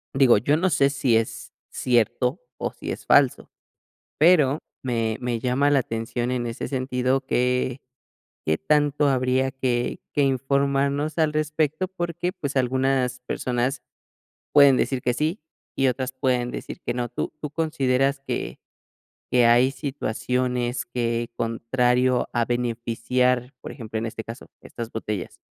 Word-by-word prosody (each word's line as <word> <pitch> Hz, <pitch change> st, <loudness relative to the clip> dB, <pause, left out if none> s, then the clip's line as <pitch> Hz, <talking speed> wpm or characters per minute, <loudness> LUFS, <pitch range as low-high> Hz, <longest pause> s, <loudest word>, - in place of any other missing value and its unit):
Digo, 130 Hz, -5 st, +6 dB
yo 145 Hz, +8 st, +2 dB
no 185 Hz, +3 st, +2 dB
sé, 140 Hz, -5 st, +3 dB
si 135 Hz, -4 st, +1 dB
es 115 Hz, 0 st, -2 dB, 0.2 s
cierto 120 Hz, +1 st, +1 dB, 0.2 s
o -, -, -3 dB
si -, -, -6 dB
es -, -, -7 dB
falso. -, -, +3 dB, 0.7 s
Pero 155 Hz, -4 st, +5 dB, 0.2 s
me 115 Hz, -3 st, -1 dB
me 120 Hz, -2 st, -2 dB
llama 130 Hz, +4 st, +2 dB
la 145 Hz, -1 st, +4 dB
atención 120 Hz, +1 st, -3 dB
en 120 Hz, -1 st, -1 dB
ese 115 Hz, -, -4 dB
sentido 130 Hz, 0 st, 0 dB
que 125 Hz, +1 st, 0 dB, 0.7 s
Qué 80 Hz, 0 st, +2 dB
tanto 145 Hz, -, +2 dB
habría 130 Hz, 0 st, +1 dB
que 125 Hz, -2 st, -1 dB
que 145 Hz, -, +2 dB
informarnos 140 Hz, +2 st, +1 dB
al 155 Hz, -1 st, +2 dB
respecto 155 Hz, +3 st, 0 dB
porque, 175 Hz, -1 st, -3 dB
pues, 140 Hz, -7 st, -5 dB
algunas 130 Hz, 0 st, +1 dB
personas 125 Hz, +1 st, -2 dB, 0.7 s
pueden 140 Hz, -3 st, +7 dB
decir 130 Hz, -2 st, 0 dB
que 125 Hz, -, +1 dB
sí 155 Hz, +6 st, -1 dB, 0.4 s
y 135 Hz, -, +2 dB
otras 130 Hz, +1 st, -2 dB
pueden 125 Hz, -2 st, 0 dB
decir -, -, -7 dB
que 120 Hz, -, -3 dB
no. 120 Hz, -1 st, -2 dB
¿Tú -, -, -4 dB
tú 150 Hz, -, -4 dB
consideras 140 Hz, -4 st, +1 dB
que -, -, -3 dB, 0.7 s
que 120 Hz, -1 st, +5 dB
hay 120 Hz, +3 st, +5 dB
situaciones 125 Hz, -2 st, -2 dB
que, 120 Hz, -1 st, -2 dB
contrario 125 Hz, +2 st, +1 dB
a 120 Hz, -, +2 dB
beneficiar, 120 Hz, +1 st, 0 dB
por -, -, -7 dB
ejemplo, 110 Hz, -4 st, -6 dB
en 115 Hz, -, -2 dB
este 110 Hz, 0 st, -5 dB
caso, 115 Hz, +3 st, -9 dB
estas 115 Hz, -1 st, -7 dB
botellas, 105 Hz, -3 st, -5 dB
125 Hz, 145 wpm, -24 LUFS, 120-140 Hz, 0.7 s, pueden